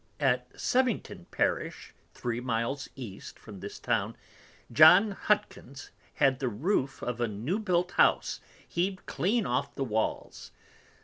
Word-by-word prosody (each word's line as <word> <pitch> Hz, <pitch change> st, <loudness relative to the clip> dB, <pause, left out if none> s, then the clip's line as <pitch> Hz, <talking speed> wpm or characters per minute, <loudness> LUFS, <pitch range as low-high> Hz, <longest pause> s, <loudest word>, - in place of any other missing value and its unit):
At 125 Hz, -3 st, +1 dB
Sevington 255 Hz, -3 st, -1 dB
Parish, -, -, -2 dB, 0.2 s
three 120 Hz, -1 st, -3 dB
Miles 125 Hz, +3 st, -2 dB
East 115 Hz, -8 st, -9 dB
from 105 Hz, -3 st, -11 dB
this 100 Hz, +2 st, -7 dB
Town, -, -, -1 dB, 0.6 s
John 180 Hz, -, +7 dB
Hutkens 145 Hz, -9 st, -2 dB, 0.2 s
had 135 Hz, -3 st, +3 dB
the 130 Hz, -3 st, -1 dB
Roof 135 Hz, -, -1 dB
of 120 Hz, 0 st, -3 dB
a 120 Hz, -, +2 dB
new 115 Hz, -, -2 dB
built 180 Hz, -4 st, 0 dB
House -, -, +2 dB, 0.3 s
heaved 185 Hz, +2 st, -2 dB
clean 220 Hz, +4 st, 0 dB
off 125 Hz, +3 st, -1 dB
the 135 Hz, -, -2 dB
Walls. 110 Hz, -3 st, -3 dB
135 Hz, 130 wpm, -29 LUFS, 120-180 Hz, 0.6 s, John